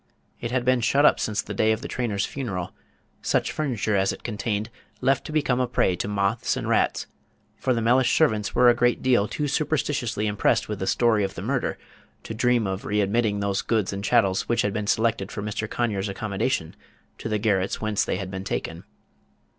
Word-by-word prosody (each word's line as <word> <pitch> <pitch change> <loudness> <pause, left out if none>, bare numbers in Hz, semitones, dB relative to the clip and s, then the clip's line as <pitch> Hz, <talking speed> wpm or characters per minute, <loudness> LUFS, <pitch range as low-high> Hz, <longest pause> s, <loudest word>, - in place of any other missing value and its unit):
It 120 - -4
had 125 0 -1
been 130 -1 +3
shut 140 +5 +3
up - - +5
since 105 -1 -1
the 105 - -6
day 110 +2 +2
of 110 +1 -1
the - - -5
trainer's 110 -6 -1
funeral, 95 -10 -4 0.5
such - - 0
furniture 120 -8 -1
as 95 0 +2
it - - -9
contained 110 -1 -3 0.3
left 135 -1 +1
to - - -6
become 145 -5 +1
a 125 - +1
prey 95 -6 +1
to 90 - -3
moths 105 +2 0
and - - -4
rats; - - +1 0.5
for 130 - -1
the 115 -2 +1
Mellish 125 +2 +4
servants 110 -10 +1
were 125 +1 +5
a 120 - +7
great 120 +1 +1
deal 120 -5 +3
too 150 +6 -2
superstitiously 140 -7 -1
impressed 105 -1 +1
with 105 -2 -4
the 95 - -3
story 115 -4 +3
of 95 0 -3
the 85 - -6
murder 125 +3 -1 0.5
to - - -6
dream 120 0 +2
of 95 0 -3
readmitting 105 +1 +1
those 100 -1 0
goods 110 -4 0
and 100 0 -5
chattels 95 -3 +2
which 120 0 +2
had 100 - -1
been 105 0 -3
selected 110 -2 +1
for 105 - -5
Mr. 105 +1 -3
Conyers' 105 -4 -1
accommodation 100 -3 -2 0.4
to - - -4
the 110 - +1
garrets 100 -3 0
whence 110 -2 0
they - - -1
had 95 -1 -5
been 95 0 -5
taken. - - -4
110 Hz, 205 wpm, -25 LUFS, 100-120 Hz, 0.5 s, a